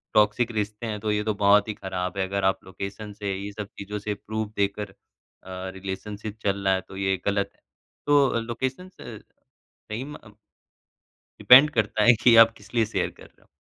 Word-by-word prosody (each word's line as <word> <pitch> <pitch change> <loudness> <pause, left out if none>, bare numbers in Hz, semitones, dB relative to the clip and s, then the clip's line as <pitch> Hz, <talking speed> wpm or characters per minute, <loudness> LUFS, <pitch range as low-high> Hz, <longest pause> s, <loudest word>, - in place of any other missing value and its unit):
Toxic 105 +3 +3
रिश्ते 105 +1 -3
हैं 105 -1 -4
तो 105 0 -2
ये 105 0 0
तो 110 -1 0
बहुत 100 +1 +4
ही 105 - -3
ख़राब 95 -1 -5
है 95 -1 0
अगर 100 0 -2
आप 95 0 +2
लोकेशन 100 +2 -7
से, 100 -1 -4
ये 100 +1 -6
सब 105 0 -6
चीज़ों 105 +1 -5
से 105 +1 -3
प्रूफ़ 110 +1 -5
देकर 100 0 -1
अ, - - -25 0.8
रिलेशनशिप 100 +3 -6
चल 100 0 -1
रहा 95 - +4
है 95 - 0
तो 95 - -9
ये 95 0 +1
गलत 100 -1 0
है। - - -34 0.5
तो 140 -5 +4
लोकेशंस 130 +10 -5
अ, - - -8 0.7
सही 110 +5 -4
में 150 +1 -8
अ 110 - -15 1.1
डिपेंड 135 +4 +8
करता 110 -4 0
है 120 - +7
कि 120 -2 +6
आप 115 - -8
किस 105 +3 -17
लिए 115 -1 +3
शेयर 110 - -2
कर - - -14
रहे - - -28
हो। - - -27
105 Hz, 205 wpm, -25 LUFS, 100-110 Hz, 1.1 s, डिपेंड